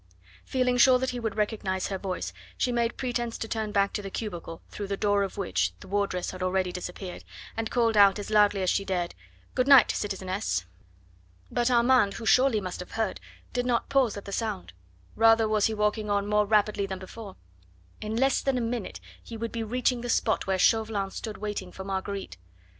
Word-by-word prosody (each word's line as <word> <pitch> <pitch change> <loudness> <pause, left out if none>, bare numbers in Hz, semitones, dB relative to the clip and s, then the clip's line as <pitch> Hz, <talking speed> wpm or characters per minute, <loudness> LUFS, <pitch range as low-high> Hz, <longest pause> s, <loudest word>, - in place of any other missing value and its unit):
Feeling 250 -1 +1
sure 255 +1 +7
that 260 +1 -1
he 245 - -4
would 225 -3 -3
recognise 205 -3 -1
her 195 -1 -3
voice, 180 - -4 0.2
she 250 - +1
made 235 -1 0
pretence 240 -2 -2
to 225 - -4
turn 220 -1 -2
back 200 -1 +2
to 205 - -2
the 195 - -6
cubicle 175 -6 -6
through 205 - -5
the 200 0 -2
door 205 0 +2
of 195 0 -3
which 195 -3 0
the - - -12
wardress 195 -2 -1
had 185 - -9
already 185 0 0
disappeared, 180 +1 -7 0.3
and 225 -1 -2
called 230 -2 +2
out 200 -1 +6
as 205 +1 -6
loudly 205 -2 +4
as 185 - +2
she 195 - +1
dared: 180 -3 -2 0.4
"Good 255 - +1
night, 275 -4 +8
citizeness!" 190 - -2 0.9
But 240 0 +1
Armand 240 -4 +4
who 230 - -6
surely 245 +1 +4
must 185 -3 -5
have 180 - -8
heard 220 -3 -1 0.3
did 245 0 -1
not 240 -2 0
pause 260 -7 +2
at 200 - -8
the 200 - -7
sound. 205 - -3 0.4
Rather 225 0 +5
was 215 -1 +2
he 220 - -3
walking 210 0 0
on 200 0 +2
now 205 - -6
more 210 - +4
rapidly 210 -1 +2
than 190 -1 -4
before. 195 +2 -10 0.7
In 215 +1 -3
less 265 +3 +2
than 270 -2 0
a - - 0
minute 230 -2 -3 0.2
he 230 - -9
would 230 +1 -4
be 230 - -3
reaching 245 +2 0
the 245 - -5
spot 225 -3 +1
where 190 -1 +1
Chauvelin 210 -1 +2
stood 220 -2 -6
waiting 205 -3 -4
for 190 - -8
Marguerite. 195 - -4
210 Hz, 205 wpm, -27 LUFS, 195-230 Hz, 0.9 s, night